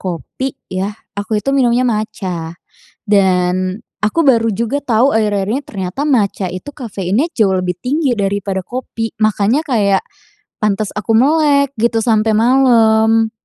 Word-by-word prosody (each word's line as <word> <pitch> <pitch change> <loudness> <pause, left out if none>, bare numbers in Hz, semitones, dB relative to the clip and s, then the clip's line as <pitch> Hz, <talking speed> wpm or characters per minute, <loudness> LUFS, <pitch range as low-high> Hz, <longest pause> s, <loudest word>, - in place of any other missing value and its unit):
kopi 185 - -5 0.2
yah, 190 +2 -2 0.2
aku 205 +2 -2
itu 275 - -2
minumnya 250 -1 +2
matcha. 185 -7 -3 0.5
Dan 185 -1 +1 0.2
aku 215 +10 +1
baru 230 -5 +3
juga 235 +7 -1
tahu 245 +3 +3
akhir-akhir 205 -3 0
ini 265 - 0
ternyata 190 +5 -5
matcha 210 -8 +1
itu 185 +10 -7
kafeinnya 210 - -2
jauh 195 -4 +2
lebih 180 -1 -1
tinggi 275 +1 0
daripada 195 -1 -1
kopi. 230 -3 -5
Makanya 215 +5 +2
kayak 205 -8 +1 0.6
pantes 210 -1 0
aku 210 +1 -1
melek 280 +1 +3
gitu 230 0 +2
sampai 220 -1 +2
malam. 225 -2 +4
220 Hz, 135 wpm, -16 LUFS, 195-250 Hz, 0.6 s, malam